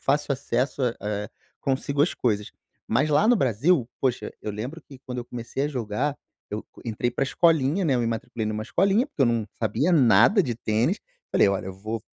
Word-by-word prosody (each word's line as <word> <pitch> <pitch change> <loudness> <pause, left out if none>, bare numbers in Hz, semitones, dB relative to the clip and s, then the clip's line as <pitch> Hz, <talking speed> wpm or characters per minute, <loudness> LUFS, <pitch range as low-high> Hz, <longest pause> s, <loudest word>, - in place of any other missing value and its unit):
fácil 145 +1 0
acesso 130 +1 -1
a, 120 -2 +1
eh, 105 0 -3 0.3
consigo 140 +1 0
as 170 - +2
coisas. 105 -4 -1 0.4
Mas 135 +7 +2
lá 150 +8 +4
no 245 - +6
Brasil, 130 - +2
poxa, 130 -3 -1
eu 105 - -3
lembro 125 +11 -6
que 135 -3 -14
quando 125 -1 -7
eu 120 - -4
comecei 120 +2 -5
a - - 0
jogar, 125 +1 -2 0.4
eu 105 +1 -3 0.2
entrei 115 +1 -1
para 130 - -1
escolinha, 160 +2 +2
né, 150 -7 +2
eu 125 - +1
me 115 - 0
matriculei 115 0 -3
numa 110 0 -2
escolinha, 195 - +2
porque 160 - -1
eu - - +5
não 115 -2 0
sabia 115 - +1
nada 135 - +5
de 125 -6 -2
tênis, 115 - 0 0.3
falei: - - +5
"olha, 100 +1 -1
eu 95 - -5
vou" 110 +3 -5
125 Hz, 200 wpm, -25 LUFS, 110-145 Hz, 0.4 s, no